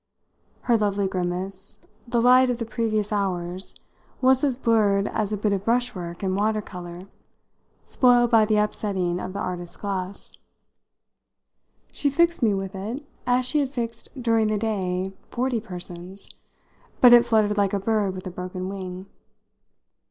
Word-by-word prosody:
Her 235 -2 +2
lovely 200 -1 +1
grimace, 185 +1 -4 0.3
the 235 0 +1
light 250 +2 +6
of 245 - 0
the 230 - -3
previous 215 -2 -1
hours, 185 -2 -2 0.4
was 260 +1 +4
as 270 -4 +1
blurred 210 -5 +2
as 210 -2 -2
a 210 - -1
bit 205 0 0
of 195 -1 -2
brushwork 205 -7 -1
in 190 -1 0
water 215 +2 +1
colour 180 -3 -8 0.8
spoiled 245 -2 +4
by 225 -2 +6
the 215 0 +2
upsetting 195 -4 0
of 185 - -5
the - - -5
artist's 180 -3 -5
glass. 195 -1 -5 1.6
She 285 - 0
fixed 340 +4 +2
me 215 -4 +3
with 195 0 -4
it 220 +9 -5 0.2
as 250 0 +3
she 300 +4 +2
had 280 -2 0
fixed 235 -3 -4
during 230 -2 +2
the 215 0 0
day 190 -3 -2 0.2
forty 250 -1 -1
persons, 180 -2 -7 0.7
but 245 -1 +8
it 240 -1 +8
fluttered 215 -3 +2
like 200 -1 +1
a 200 - +1
bird 205 -2 0
with 185 - -8
a 185 - -5
broken 185 +1 -5
wing. 185 -1 -6
210 Hz, 155 wpm, -24 LUFS, 185-235 Hz, 1.6 s, but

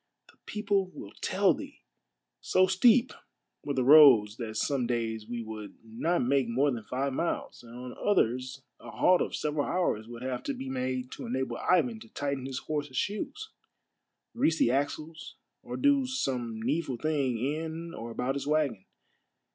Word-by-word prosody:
The - - -31
people 200 -2 0
will 100 - -10
tell - - +3
thee! - - -10 0.3
" - - -56 0.3
So 185 - +3
steep 230 +7 +4 0.5
were 145 -1 -3
the 130 - +1
roads 125 -7 +7
that 110 -3 -5
some 135 -2 0
days 115 -2 -2
we 120 0 -4
would 110 -2 -8
not 120 +10 -1
make 135 0 +2
more 135 +5 +2
than 115 -3 -4
five 135 +1 -2
miles, 170 +5 -3
and 120 0 -13
on 125 0 -8
others 130 - 0 0.2
a - - -11
halt 180 0 +3
of - - -2
several 150 -1 -1
hours 145 -12 0
would 120 +1 -9
have 130 -1 -3
to - - -2
be 135 - -6
made 130 -1 -3
to - - -7
enable 130 +2 -2
Ivan 125 -11 +2
to 110 - -14
tighten 140 -1 -3
his 135 -1 -4
horses' 145 -4 -4
shoes, 420 - -3 0.8
grease 160 0 +2
the 120 - +3
axles, 155 +4 -3 0.3
or - - -6
do 280 -2 +3
some 125 - -2
needful 135 +2 -1
thing 140 -3 0
in 160 +6 -3
or 115 +1 -7
about 125 +3 -2
his 140 0 -4
wagon. 145 -10 +1
135 Hz, 170 wpm, -29 LUFS, 120-160 Hz, 0.8 s, roads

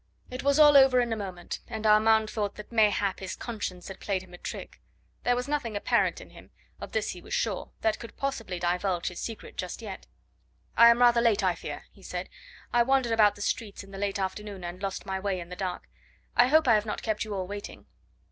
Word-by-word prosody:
It 255 - -4
was 280 +1 +2
all 295 -1 +8
over 265 -2 +7
in 240 -2 +1
a - - -1
moment, 185 -4 -6
and 220 -2 -5
Armand 220 0 +5
thought 205 -2 -2
that 210 - -10
mayhap 205 -4 +2
his 190 -1 -5
conscience 195 -6 -5
had 195 - -8
played 190 -2 -2
him 180 -1 -17
a - - -9
trick: - - -7 0.4
there 245 - +3
was 250 +2 -3
nothing 285 -7 -2
apparent 205 - +1
in - - -13
him - - -15 0.3
of - - -8
this - - -1
he - - -9
was - - -4
sure - - -1
that 220 -1 +1
could 230 - -10
possibly 225 -9 -3
divulge 175 +1 0
his 180 - -9
secret 225 -2 -7
just 180 - -4
yet. 210 -5 -8 0.7
"I 235 0 +9
am 235 +1 +4
rather 240 -1 +6
late, 220 -3 +3
I 185 -2 +3
fear," 170 - -7
he - - -20
said. - - -5 0.4
"I 240 - +5
wandered 260 -1 +2
about 215 -2 +5
the 205 - -6
streets 210 -3 -3
in 195 - -15
the 195 - -8
late 200 0 -1
afternoon 195 0 -4
and 175 +2 -6
lost 195 -1 -4
my 190 0 -2
way 190 -1 -1
in 170 0 -8
the 180 - -6
dark. 185 -1 -4 0.5
I 245 - +6
hope 315 +2 +4
I 235 - +7
have 210 0 +3
not - - -4
kept 220 -2 -1
you 215 -2 -5
all 190 -1 -2
waiting." 205 +2 -8
210 Hz, 235 wpm, -28 LUFS, 190-235 Hz, 0.7 s, I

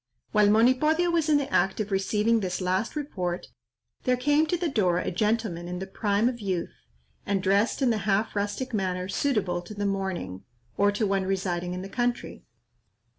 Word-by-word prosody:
While 210 -1 +4
Monipodio 260 +10 +3
was 330 -2 +1
in 300 - +5
the 280 -1 -3
act 195 +4 +2
of 210 -1 -2
receiving 210 +4 +2
this 185 -3 -2
last 185 +7 -1
report, 185 -12 -3 0.5
there 250 -1 +1
came 290 +5 +2
to 350 - 0
the 345 0 -1
door 190 - +2
a - - -1
gentleman 210 -3 -1
in 180 0 -4
the 190 - -4
prime 205 +3 0
of 245 -1 -2
youth, 185 -4 -2 0.5
and 200 -1 0
dressed 200 +7 +2
in 250 - +4
the 220 - 0
half 205 +3 +1
rustic 205 +5 -2
manner 185 -3 -1
suitable 195 -7 0
to 195 +4 -10
the 205 0 -2
morning, 190 - -3 0.3
or 205 0 +3
to 205 +2 0
one 195 -1 0
residing 180 -2 -2
in 185 - -5
the - - -6
country. 245 +3 -2
205 Hz, 185 wpm, -27 LUFS, 185-240 Hz, 0.5 s, in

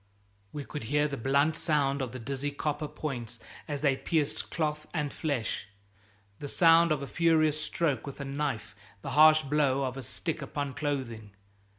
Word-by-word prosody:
We 145 -2 -6
could 150 -7 -6
hear 150 +5 +2
the 145 - -4
blunt 140 +5 +2
sound 140 -3 +1
of 130 -3 -3
the 130 - -6
dizzy 135 +4 -3
copper 150 +1 -2
points 125 -6 -5 0.3
as 145 -2 -3
they 140 -3 +3
pierced 155 +1 -1
cloth 150 -2 -2
and 150 -3 -1
flesh, 140 -12 -2 0.7
the 145 - -5
sound 165 +2 +5
of 145 -2 +1
a - - -5
furious 155 -2 +2
stroke 155 -3 -1
with 140 - -7
a 140 - -4
knife, 135 -7 -3 0.3
the - - -4
harsh 155 +1 +7
blow 140 -2 +2
of 130 0 -3
a - - -4
stick 160 +6 -4
upon 140 0 -3
clothing. 115 -8 -4
145 Hz, 175 wpm, -29 LUFS, 135-155 Hz, 0.7 s, harsh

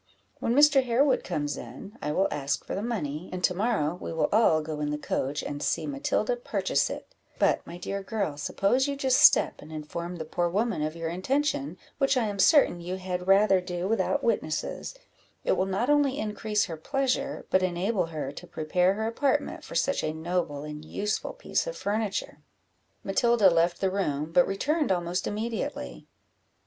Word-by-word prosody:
When 235 - 0
Mr. 290 -1 +6
Harewood 255 +3 +2
comes 145 -4 -2
in, 130 - -9
I 150 - -2
will 190 +6 +2
ask 140 -1 -2
for - - -5
the 195 - -2
money, 180 -8 -3
and 180 0 -5
to 180 - +3
morrow 190 -6 0
we - - -5
will 165 - 0
all 185 -8 +4
go 155 -1 -5
in 150 0 -1
the 150 - -1
coach, 145 -1 -2
and 145 0 -5
see - - 0
Matilda 290 - -1
purchase - - 0
it: - - -8 0.2
but, - - +3
my 170 - -7
dear 195 +2 -4
girl, 195 -6 -2
suppose 200 - +1
you 280 - -2
just 265 -2 +2
step - - +5
and 155 - -12
inform 170 +3 -5
the 160 -2 -5
poor 175 +2 -1
woman 210 -1 0
of 155 +1 -2
your 165 -1 -3
intention, 185 - -1 0.2
which 275 -1 +3
I 240 - +2
am 205 -2 -4
certain 230 - +5
you 180 +2 -4
had 180 -1 -4
rather 195 -1 +5
do 180 0 -3
without 225 +6 0
witnesses; 205 - -2 0.5
it - - +1
will 190 - +1
not 195 +6 0
only 290 -2 +3
increase 210 0 -1
her 165 - -6
pleasure, 270 - -1
but 185 - +4
enable 185 +2 0
her 150 -4 -4
to - - -10
prepare 180 +4 +1
her 220 +1 -2
apartment 280 +5 0
for - - -9
such 275 - +1
a 155 - -1
noble 160 -3 -2
and 150 0 -7
useful 210 +6 -3
piece - - -2
of - - -5
furniture." 205 -6 -2 0.6
Matilda 215 -1 +4
left 170 +1 +2
the 190 -1 +1
room, 155 -6 -1
but 175 +1 +4
returned 290 +8 0
almost 175 0 -1
immediately. 205 - -4
190 Hz, 185 wpm, -27 LUFS, 160-235 Hz, 0.6 s, Mr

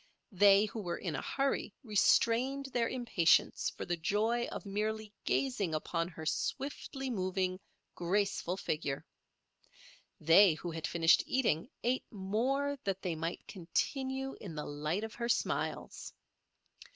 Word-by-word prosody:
They 200 +1 +6
who 215 +1 -5
were 175 -3 -3
in 170 -5 -3
a - - -3
hurry 275 -6 -1
restrained 240 +4 +3
their 235 -2 +1
impatience 235 -10 +2
for - - -7
the 175 - -1
joy 215 +8 0
of - - -7
merely 215 +1 -2
gazing 210 -12 0
upon 165 +2 -1
her 160 -3 -9
swiftly 270 - -3
moving, 185 -2 -1 0.3
graceful 185 0 0
figure. 150 -6 -3 1.1
They 165 +2 +6
who 175 +2 -5
had 160 -1 -3
finished 165 -1 +4
eating 245 -7 +1
ate 250 +2 0
more 255 +8 -1
that 195 -2 -2
they 180 -3 -1
might 165 +1 -4
continue 265 +8 -2
in 175 -6 -7
the 150 - -4
light 150 +7 -2
of 220 0 -5
her 235 0 -3
smiles. - - -2
200 Hz, 135 wpm, -33 LUFS, 170-240 Hz, 1.1 s, They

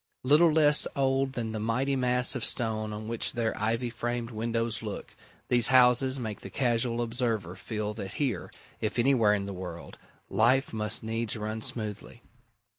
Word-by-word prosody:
Little 150 +5 +5
less 150 -1 +5
old 135 0 +1
than 115 -4 -3
the 110 - -4
mighty 125 +6 0
mass 125 0 +2
of 130 -4 -4
stone 110 -3 -1
on 105 +1 -6
which 115 0 -2
their 115 -1 -1
ivy 115 +3 -1
framed 120 0 -4
windows 115 0 -2
look, 105 -3 -7 0.3
these 120 -2 +7
houses 130 +1 +5
make 110 -4 -5
the 95 - -8
casual 120 0 0
observer 115 -6 -2
feel 105 +3 -4
that 100 -2 -7
here, 125 - -2 0.3
if 110 +1 -2
anywhere 120 -4 +3
in 100 -1 -3
the 100 - -6
world, 90 -2 -8 0.3
life 130 +4 +2
must 105 +1 -2
needs 115 0 -3
run 110 +1 -4
smoothly. 110 -3 -5
115 Hz, 165 wpm, -28 LUFS, 110-125 Hz, 0.3 s, these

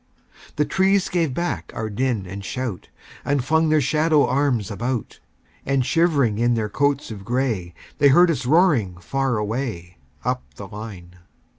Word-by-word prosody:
The 150 - +1
trees 190 +2 +2
gave 165 -5 0
back 125 - -3
our 110 - -3
din 115 -1 -1
and 100 +2 -7
shout, 120 -4 -5 0.3
And 140 -3 0
flung 160 +2 +2
their 155 0 +4
shadow 155 0 +3
arms 130 -8 0
about; 120 +2 -3 0.4
And 135 -2 +1
shivering 140 -7 +2
in 120 0 +2
their 110 -2 -1
coats 140 +2 0
of 100 -3 -8
gray, 115 -8 -2 0.2
They 145 - +6
heard 175 +5 +6
us 130 -5 -3
roaring 140 - +3
far 135 +6 -1
away, 105 - -4 0.3
Up - - -1
the 100 - -8
line. 100 -4 -9
125 Hz, 155 wpm, -22 LUFS, 105-145 Hz, 0.4 s, They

